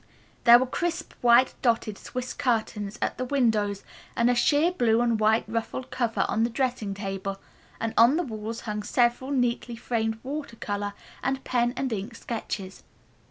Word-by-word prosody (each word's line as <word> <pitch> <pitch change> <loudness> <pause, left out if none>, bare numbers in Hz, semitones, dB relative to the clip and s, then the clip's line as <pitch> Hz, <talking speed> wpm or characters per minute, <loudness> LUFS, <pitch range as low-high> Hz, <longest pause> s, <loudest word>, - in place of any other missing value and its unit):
There 235 0 +10
were 255 - +1
crisp, 340 +6 -3
white 245 +1 +5
dotted 230 -4 +1
swiss 255 +4 -5
curtains 220 -4 -1
at - - -2
the 255 - -1
windows 220 -7 +1 0.3
and 235 +1 +3
a - - +3
sheer 290 +7 +3
blue 235 -10 +2
and 235 -2 +2
white 220 +1 +3
ruffled 230 +3 -4
cover 240 -3 0
on 225 -1 +1
the 235 - +2
dressing 240 -5 -1
table, 195 -1 -4 0.4
while 225 -1 -3
on 240 +6 +6
the 350 - +1
walls 225 -3 -5
hung 210 -1 -3
several 240 +4 +1
neatly 245 -3 0
framed 225 -1 -1
water 280 -2 -5
color 205 -2 -3 0.3
and 270 0 -1
pen 240 0 +1
and 265 -3 -1
ink 215 +3 -5
sketches. 205 -5 -5
235 Hz, 165 wpm, -26 LUFS, 215-255 Hz, 0.4 s, There